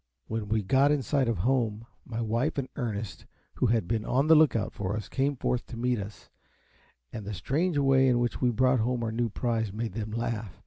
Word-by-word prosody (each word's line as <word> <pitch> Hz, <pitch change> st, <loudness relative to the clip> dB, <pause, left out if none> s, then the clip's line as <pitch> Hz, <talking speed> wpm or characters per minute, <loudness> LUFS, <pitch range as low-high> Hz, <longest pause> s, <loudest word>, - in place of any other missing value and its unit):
When 110 Hz, -1 st, -4 dB
we 110 Hz, -1 st, +1 dB
got 135 Hz, +8 st, +4 dB
in 145 Hz, -3 st, +1 dB
sight 140 Hz, -2 st, +1 dB
of 115 Hz, -3 st, 0 dB
home, 115 Hz, 0 st, 0 dB, 0.2 s
my 115 Hz, -1 st, -4 dB
wife 115 Hz, +4 st, 0 dB
and 135 Hz, -2 st, -1 dB
Ernest, 105 Hz, -, -4 dB, 0.3 s
who -, -, +2 dB
had 110 Hz, -5 st, +1 dB
been 110 Hz, +1 st, -1 dB
on 135 Hz, +5 st, +1 dB
the 160 Hz, -, +6 dB
look 155 Hz, -5 st, +5 dB
out 110 Hz, -, -1 dB
for 100 Hz, 0 st, -3 dB
us, 110 Hz, -, -5 dB
came 140 Hz, +1 st, 0 dB
forth 125 Hz, -1 st, -2 dB
to 120 Hz, -, -8 dB
meet 125 Hz, 0 st, 0 dB
us; 100 Hz, +1 st, -9 dB, 0.8 s
and 110 Hz, -, -5 dB
the 105 Hz, +1 st, -5 dB
strange 150 Hz, -, 0 dB
way 135 Hz, -1 st, +4 dB
in 125 Hz, -2 st, +3 dB
which 120 Hz, 0 st, -1 dB
we 125 Hz, -, +3 dB
brought 130 Hz, +2 st, +3 dB
home 120 Hz, +1 st, 0 dB
our 110 Hz, -, -1 dB
new 115 Hz, +1 st, 0 dB
prize 110 Hz, -1 st, -1 dB
made 110 Hz, 0 st, -4 dB
them 110 Hz, 0 st, -4 dB
laugh. 110 Hz, -3 st, -4 dB
115 Hz, 225 wpm, -28 LUFS, 110-130 Hz, 0.8 s, the